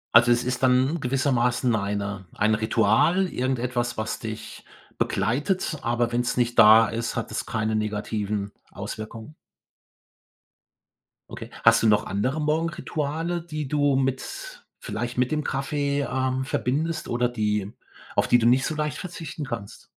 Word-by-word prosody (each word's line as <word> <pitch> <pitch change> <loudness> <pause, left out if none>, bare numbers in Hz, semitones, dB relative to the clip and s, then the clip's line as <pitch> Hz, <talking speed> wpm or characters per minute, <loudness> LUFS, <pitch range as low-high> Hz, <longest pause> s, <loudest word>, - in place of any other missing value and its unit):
Also 120 +1 +8
es 120 0 0
ist 125 0 -2
dann 130 +5 +3
gewissermaßen 125 -2 +1
eine 100 -2 -2
ein 110 +1 +2
Ritual, 110 - +3
irgendetwas, 125 -4 -2
was 110 0 -3
dich - - -7 0.3
begleitet, 155 - 0
aber 120 0 0
wenn's 120 +1 0
nicht 120 -1 +1
da 110 0 +8
ist, 115 +1 -3
hat - - -3
es - - -3
keine 110 -1 -1
negativen 105 -1 -2 0.2
Auswirkungen? 110 +5 -7 2.0
Okay. - - -8
Hast 115 0 +6
du 115 - +3
noch 105 -1 +3
andere 130 +10 -1
Morgenrituale, 160 +1 -1
die 155 -3 -5
du 145 -1 +2
mit 130 -1 -3
vielleicht 120 +2 -4
mit 125 0 +1
dem 150 -2 -1
Kaffee, 140 +1 -1
ähm, 130 -1 -1
verbindest 150 +5 -1
oder 120 0 +1
die 105 -4 -1 0.5
auf - - +3
die 120 - +5
du 115 - +2
nicht 130 +2 +4
so 155 - -2
leicht 150 -2 -2
verzichten 165 -4 -6
kannst? 115 -6 -7
125 Hz, 140 wpm, -25 LUFS, 110-145 Hz, 2.0 s, Also